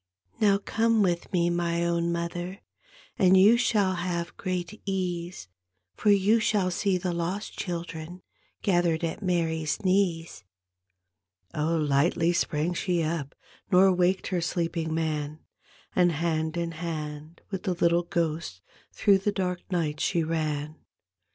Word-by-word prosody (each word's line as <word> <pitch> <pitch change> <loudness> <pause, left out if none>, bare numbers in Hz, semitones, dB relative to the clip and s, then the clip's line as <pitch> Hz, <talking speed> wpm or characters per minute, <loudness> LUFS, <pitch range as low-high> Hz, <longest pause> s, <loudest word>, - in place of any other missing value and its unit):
" 90 +1 -30
Now 200 -2 +5
come 225 +2 +1
with 175 -2 -1
me, 175 -2 +2
my 170 0 0
own 170 0 0
mother, 175 +3 -4 0.6
And 190 0 +6
you 205 +5 +7
shall 215 -6 +2
have 175 -1 -3
great 185 +1 -4
ease. 180 - -3 0.5
For 210 - +1
you 205 +3 +4
shall 205 -4 +1
see 190 +1 +1
the 180 -1 -2
lost 175 +5 -3
children 170 -1 -5 0.4
Gathered 175 -4 +2
at 165 +5 -3
Mary's 165 -2 -1
knees." 180 - 0 1.1
Oh, 155 +2 0
lightly 155 +3 +2
sprang 165 0 0
she 175 -1 0
up 155 -3 -3 0.4
Nor 190 +1 +6
waked 180 +1 +1
her 180 -2 0
sleeping 165 -1 -2
man, 155 -2 -2 0.6
And 175 -2 +4
hand 160 +1 -1
in 170 -1 -2
hand 155 -1 -6
with 190 -2 -3
the 185 - -1
little 170 0 +3
ghost 165 - -2 0.3
Through 200 -2 +3
the 205 +2 0
dark 180 -3 -2
night 155 -4 -1
she 170 +1 +1
ran. 155 -1 -2
170 Hz, 140 wpm, -27 LUFS, 165-185 Hz, 1.1 s, you